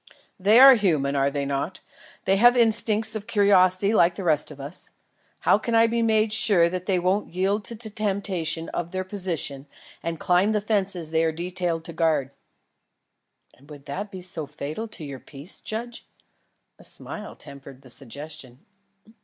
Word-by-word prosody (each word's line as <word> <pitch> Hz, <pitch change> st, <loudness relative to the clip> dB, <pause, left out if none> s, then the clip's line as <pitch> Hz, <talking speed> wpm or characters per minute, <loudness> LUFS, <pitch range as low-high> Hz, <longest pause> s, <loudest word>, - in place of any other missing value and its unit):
"They 210 Hz, +5 st, +5 dB
are 270 Hz, +1 st, +10 dB
human, 155 Hz, -, +1 dB
are 140 Hz, 0 st, +2 dB
they 140 Hz, 0 st, -3 dB
not? 140 Hz, +6 st, -3 dB, 0.5 s
They 195 Hz, -, +2 dB
have 240 Hz, +4 st, +5 dB
instincts 220 Hz, -1 st, +5 dB
of 215 Hz, 0 st, -6 dB
curiosity 200 Hz, -2 st, +3 dB
like 175 Hz, -4 st, +3 dB
the 195 Hz, -, -6 dB
rest 155 Hz, -4 st, +3 dB
of 145 Hz, -2 st, -12 dB
us. 145 Hz, +6 st, -4 dB, 0.5 s
How -, -, +3 dB
can 230 Hz, +1 st, -2 dB
I 225 Hz, 0 st, +6 dB
be 230 Hz, +1 st, 0 dB
made 220 Hz, -1 st, +2 dB
sure 205 Hz, -7 st, +4 dB
that 185 Hz, +1 st, -5 dB
they 190 Hz, -2 st, +2 dB
won't 185 Hz, +1 st, -1 dB
yield 195 Hz, +3 st, 0 dB
to 235 Hz, -, -5 dB
the 220 Hz, -1 st, -6 dB
temptation 195 Hz, -6 st, -2 dB
of 175 Hz, -1 st, -4 dB
their 185 Hz, +1 st, -3 dB
position 175 Hz, -8 st, -4 dB, 0.3 s
and 165 Hz, -1 st, -4 dB
climb 185 Hz, +4 st, +2 dB
the 210 Hz, -, +1 dB
fences 195 Hz, -6 st, -1 dB
they 160 Hz, 0 st, +2 dB
are 165 Hz, -, +1 dB
detailed 175 Hz, 0 st, -3 dB
to 170 Hz, -, -9 dB
guard?" 155 Hz, -5 st, 0 dB, 1.2 s
"And 140 Hz, +3 st, -22 dB
would 145 Hz, -2 st, -12 dB
this 190 Hz, +9 st, -5 dB
be 190 Hz, -2 st, -9 dB
so 170 Hz, -4 st, -5 dB
fatal 150 Hz, +9 st, -6 dB
to 210 Hz, -, -9 dB
your 140 Hz, -2 st, -8 dB
peace, 145 Hz, +8 st, -6 dB
judge?" 235 Hz, +2 st, -7 dB, 0.7 s
A -, -, -15 dB
smile -, -, -5 dB
tempered 140 Hz, -1 st, -13 dB
the 130 Hz, -, -10 dB
suggestion. 140 Hz, 0 st, -7 dB
180 Hz, 175 wpm, -24 LUFS, 155-210 Hz, 1.2 s, are